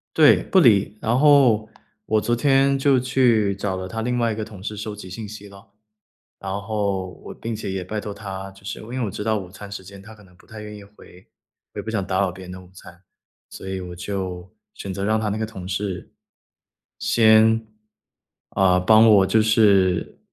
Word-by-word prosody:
对， - - +6
不 190 - +3
理。 105 - +4
然 115 +3 +1
后 130 -7 +4 0.4
我 110 -1 +2
昨 120 - 0
天 135 +1 +3
就 135 -1 +3
去 120 -6 +2
找 95 -1 -3
了 95 0 -5
他 110 +3 -5
另 125 +1 -1
外 115 -1 +1
一 - - -3
个 110 - -4
同 105 -4 -11
事 105 - -5
收 105 0 -6
集 95 -3 -10
信 105 +3 -7
息 105 -1 -10
了， 100 +2 -16 0.7
然 95 -1 -6
后 100 -3 -2
我 - - -7
并 115 -1 -5
且 100 -2 -5
也 95 -1 -3
拜 105 +3 -4
托 105 - -6
他 95 -2 -7
就 95 0 -19
是 105 - -5
因 110 - -11
为 130 +2 -5
我 105 -5 -2
知 105 - -5
道 110 0 +1
午 95 -3 -7
餐 100 +1 -11
时 100 -2 -7
间 100 +1 -12
他 110 +2 -13
可 105 - -18
能 90 -1 -21
不 - - -23
太 110 -1 -10
愿 105 0 -9
意 105 - -11
回， 100 -3 -18 0.5
我 - - -6
也 - - -2
不 110 - -5
想 100 -4 -2
打 95 -1 -1
扰 95 -2 0
别 95 +1 -11
人 90 - -10
的 95 - -8
午 90 - -17
餐， 90 0 -15 0.5
所 95 - -10
以 95 0 -4
我 90 -1 -8
就 95 -1 -5 0.2
选 95 -1 -7
择 100 +2 -3
让 110 +1 +1
他 110 -1 -1
那 105 - -2
个 110 - -2
同 95 -5 -9
事 95 -2 -4 0.9
先， 110 0 +4 0.9
呃， 90 -1 +4
帮 110 +4 +6
我 100 -3 +6
就 110 - +3
是， 100 -5 +2
105 Hz, 240 characters per minute, -22 LUFS, 95-110 Hz, 0.9 s, 对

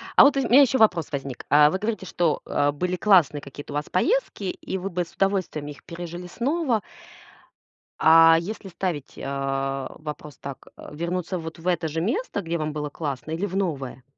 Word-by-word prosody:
А - - +9
вот, 285 - +5
ы - - +3
у - - -3
меня 265 +4 +8
еще 265 -1 +4
вопрос 175 -9 +3
возник. 135 -3 -5
А, 150 0 +7
вы 185 - -1
говорите, 215 -1 -3
что, 165 -2 0
э, 145 0 +1
были 180 +5 -2
классные 180 -7 +4
какие-то 145 +1 -9
у - - -5
вас 150 +1 -1
поездки 355 - 0
и 190 +1 -4
вы 190 +2 -4
бы 180 -1 -2
с - - -19
удовольствием 190 -6 -1
их 145 -1 -10
пережили 175 +1 -7
снова. 255 - 0 1.2
А 165 0 +7
если 195 +3 -6
ставить, 175 -6 -4
а, 135 -1 -2
вопрос 150 -2 -8
так: 140 -2 -9 0.2
вернуться 175 +3 -3
вот 160 0 -7
в 165 - -7
это 175 -2 +1
же 160 +1 -2
место, 235 - -1
где 170 -2 -2
вам 155 -1 -3
было 150 -1 -3
классно, 145 -1 -5
или 165 +5 -1
в 190 -2 -5
новое? 140 -10 -2
170 Hz, 195 wpm, -24 LUFS, 150-190 Hz, 1.2 s, А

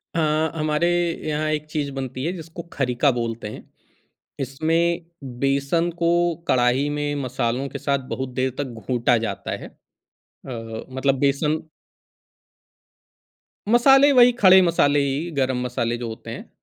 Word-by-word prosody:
अ, - - +1 0.4
हमारे 155 +2 +1 0.4
यहाँ 155 +1 -1
एक 155 0 -2
चीज़ 150 -2 -2
बनती 130 -1 -5
है 170 - 0
जिसको 165 -1 -8
खरीका 130 +1 +1
बोलते 115 -3 -3
हैं, 105 - -9 0.8
इसमें 165 +5 0 0.3
बेसन 140 +5 +1
को 170 0 +3 0.4
कढ़ाही 125 +3 +2
में 145 0 -2
मसालों 125 +1 -2
के - - -6
साथ 140 -1 0
बहुत 130 0 -3
देर 130 0 0
तक 145 - 0 0.2
घूँटा 120 -1 +2
जाता 100 0 -5
है। - - -7
अ, - - -21 1.2
मतलब 130 +1 +1
बेसन 145 +3 +1 2.1
मसाले 270 +5 +6
वही 250 -2 +7
खड़े 190 -5 +7
मसाले 155 -5 +3
ही, 140 +5 -1
गरम 130 -4 0
मसाले 120 -1 -2
जो 120 0 -5
होते 110 - -8
हैं। - - -8
140 Hz, 135 wpm, -23 LUFS, 130-165 Hz, 2.1 s, वही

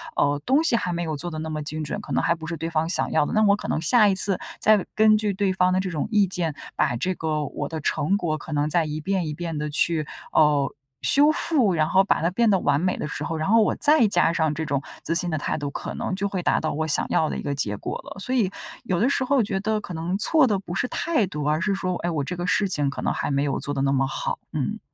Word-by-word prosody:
呃， 145 0 +1
东 275 +5 +3
西 300 - +3
还 180 -6 -1
没 170 0 -2
有 160 -2 -3
做 175 +4 -5
得 155 - -6
那 160 0 -5
么 155 -1 -4
精 155 +1 -4
准， 145 - -4
可 - - -10
能 - - +2
还 170 - +3
不 160 -1 -9
是 165 - -3
对 165 +2 -4
方 160 0 0
想 175 - -1
要 155 - +2
的。 - - -4
那 215 - +3
我 200 -1 +5
可 - - -7
能 - - -1
下 210 +6 +5
一 195 - +2
次 190 0 +6 0.2
再 215 -3 +3
根 215 0 +5
据 210 -2 -1
对 195 0 0
方 185 -1 +2
的 185 - +2
这 190 0 -2
种 155 -3 -2
意 210 -2 +4
见， 170 -4 -2 0.2
把 120 - +1
这 185 +10 -1
个 155 -2 -2
我 - - -5
的 160 - -4
成 150 +5 0
果 155 -5 -2
可 155 - -10
能 145 +1 0
再 165 +1 +2
一 155 +1 -4
遍 185 0 -1
一 150 - -3
遍 165 0 -5
地 150 0 -3
去， 155 0 0 0.2
哦， 150 -2 +3 0.3
修 290 +2 +5
复， 265 - +1
然 155 -1 +1
后 190 +1 +4
把 190 - +1
它 170 - +2
变 230 +4 +2
得 195 - +4
完 145 +1 +1
美 185 +1 0
的 - - -4
时 150 0 -5
候， 160 +1 -3
然 155 - -2
后 225 0 +5
我 - - +1
再 295 -6 +5
加 175 -4 +2
上 160 -2 +1
这 160 +1 -4
种 140 -2 -1 0.2
自 165 - -1
信 175 +1 +1
的 155 - -1
态 145 - -2
度， 145 -2 -4
可 - - -6
能 - - -3
就 200 +1 -1
会 195 -2 -3
达 - - +1
到 155 - -2
我 155 +1 -2
想 150 - +1
要 155 - +1
的 - - -4
一 - - -4
个 145 - -2
结 105 -7 -2
果 - - -5
了。 - - -10
所 250 +6 -3
以 220 -7 +2 0.3
有 185 -7 -1
的 235 - +3
时 270 - 0
候 265 -2 +2
觉 195 -2 -2
得 215 +1 -1
可 180 - -8
能 170 +3 -2
错 290 +5 +3
的 205 - +1
不 190 -2 -7
是 250 - -1
态 310 - 0
度， 150 -5 -5
而 150 +3 0
是 200 +1 0
说， 185 -1 -2
哎， 175 - -3
我 150 -4 -1
这 180 +6 -5
个 175 +1 -3
事 200 +2 +2
情 145 -6 0
可 140 - -6
能 - - 0
还 - - -3
没 140 0 +1
有 140 -2 -1
做 145 - -4
得 135 - -2
那 135 0 +1
么 135 -1 +1
好， 145 - -3
嗯。 155 - -2
170 Hz, 320 characters per minute, -24 LUFS, 150-200 Hz, 0.3 s, 次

